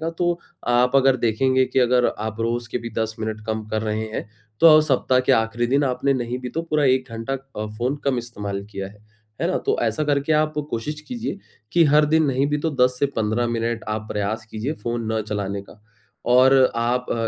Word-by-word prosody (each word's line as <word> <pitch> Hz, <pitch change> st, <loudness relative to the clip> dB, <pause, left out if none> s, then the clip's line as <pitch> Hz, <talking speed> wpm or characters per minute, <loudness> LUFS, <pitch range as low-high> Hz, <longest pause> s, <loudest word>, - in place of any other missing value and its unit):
का 165 Hz, +1 st, -2 dB
तो 175 Hz, -1 st, +1 dB, 0.3 s
आप 125 Hz, +2 st, +3 dB
अगर 135 Hz, -1 st, +4 dB
देखेंगे 130 Hz, +3 st, +2 dB
कि 130 Hz, -, -1 dB
अगर 125 Hz, 0 st, +3 dB
आप 110 Hz, +1 st, -4 dB
रोज़ 120 Hz, 0 st, -1 dB
के 125 Hz, -, -1 dB
भी 115 Hz, 0 st, -7 dB
10 110 Hz, 0 st, -1 dB
मिनट 110 Hz, -1 st, -3 dB
कम 110 Hz, -1 st, -2 dB
कर 110 Hz, 0 st, -2 dB
रहे 110 Hz, 0 st, -2 dB
हैं, -, -, -4 dB, 0.3 s
तो 165 Hz, -, +7 dB
अब 155 Hz, -, +7 dB
सप्ताह 130 Hz, -3 st, +2 dB
के 130 Hz, +1 st, +2 dB
आख़िरी 115 Hz, 0 st, +1 dB
दिन 140 Hz, +3 st, +2 dB
आपने 135 Hz, +1 st, +1 dB
नहीं 120 Hz, -1 st, -3 dB
भी 125 Hz, -1 st, -6 dB
तो 165 Hz, +6 st, -3 dB
पूरा 155 Hz, -3 st, 0 dB
1 130 Hz, -1 st, +2 dB
घंटा 115 Hz, +3 st, -5 dB
अ, 135 Hz, -5 st, -6 dB
फ़ोन 125 Hz, +4 st, 0 dB
कम 135 Hz, -3 st, +1 dB
इस्तेमाल 105 Hz, -4 st, -5 dB
किया 100 Hz, -2 st, -5 dB
है, 105 Hz, +1 st, -19 dB, 0.4 s
है -, -, +1 dB
ना? -, -, 0 dB
तो -, -, -1 dB
ऐसा 115 Hz, +6 st, 0 dB
करके 145 Hz, +1 st, +1 dB
आप 155 Hz, 0 st, +2 dB, 0.2 s
कोशिश 150 Hz, +7 st, -4 dB
कीजिए 235 Hz, -4 st, -4 dB, 0.3 s
कि, 170 Hz, -1 st, +5 dB
हर 150 Hz, 0 st, +5 dB
दिन 160 Hz, +1 st, +3 dB
नहीं 135 Hz, 0 st, +1 dB
भी 150 Hz, -, 0 dB
तो 160 Hz, +2 st, -1 dB
10 125 Hz, 0 st, 0 dB
से 140 Hz, -, +2 dB
15 110 Hz, +2 st, 0 dB
मिनट 115 Hz, 0 st, -2 dB
आप 110 Hz, 0 st, -3 dB
प्रयास 105 Hz, +2 st, -2 dB
कीजिए 115 Hz, +7 st, -3 dB
फ़ोन 115 Hz, -1 st, -2 dB
न 110 Hz, -, 0 dB
चलाने 100 Hz, -1 st, -3 dB
का 105 Hz, +1 st, -17 dB, 0.5 s
और 130 Hz, +2 st, +6 dB, 0.2 s
आप 120 Hz, +2 st, 0 dB
अ -, -, +1 dB
120 Hz, 220 wpm, -22 LUFS, 110-135 Hz, 0.5 s, तो